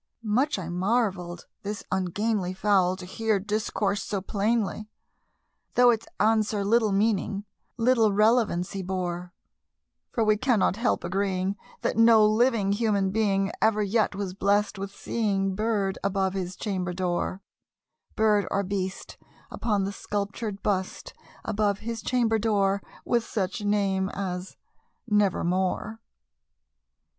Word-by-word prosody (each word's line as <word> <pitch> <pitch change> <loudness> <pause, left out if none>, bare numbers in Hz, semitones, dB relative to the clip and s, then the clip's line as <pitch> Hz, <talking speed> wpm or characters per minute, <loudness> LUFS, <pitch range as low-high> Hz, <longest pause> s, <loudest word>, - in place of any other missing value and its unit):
Much 240 +7 +1
I 185 -4 -5
marvelled 180 -2 -1 0.2
this 205 +1 -5
ungainly 190 +1 -1
fowl 190 -2 +2
to 185 -1 -9
hear 220 +2 0
discourse 210 0 -1
so 205 - -2
plainly, 210 +1 -1 0.9
Though 245 0 +7
its 225 -1 -2
answer 215 -1 +2
little 220 0 +3
meaning 200 0 0 0.3
little 230 -2 +3
relevancy 205 -3 +2
bore; 180 -1 -3 0.8
For 230 - +1
we 215 -1 +3
cannot 235 -5 +2
help 235 - 0
agreeing 190 +1 -1 0.3
that - - -1
no 225 -1 +7
living 215 -2 +3
human 200 -3 +1
being 200 -2 +1
Ever 215 -1 +3
yet 205 0 +1
was 195 -2 -3
blessed 200 +1 +1
with 195 0 -4
seeing 195 -2 -1
bird 205 -2 -1
above 195 -1 0
his 185 -1 -4
chamber 185 -3 -3
door 185 +1 -2 0.7
Bird 210 -2 +3
or 200 - 0
beast 190 0 -4 0.3
upon 210 -4 0
the 195 - -2
sculptured 205 +1 -4
bust 190 -2 -2 0.3
above 205 -2 0
his 230 0 -4
chamber 230 -3 +1
door, 200 -2 +1 0.2
With 240 -2 +2
such 205 0 -3
name 195 -2 +1
as 185 -2 -5 0.5
"Nevermore." 200 +1 0
200 Hz, 125 wpm, -26 LUFS, 190-220 Hz, 0.9 s, Though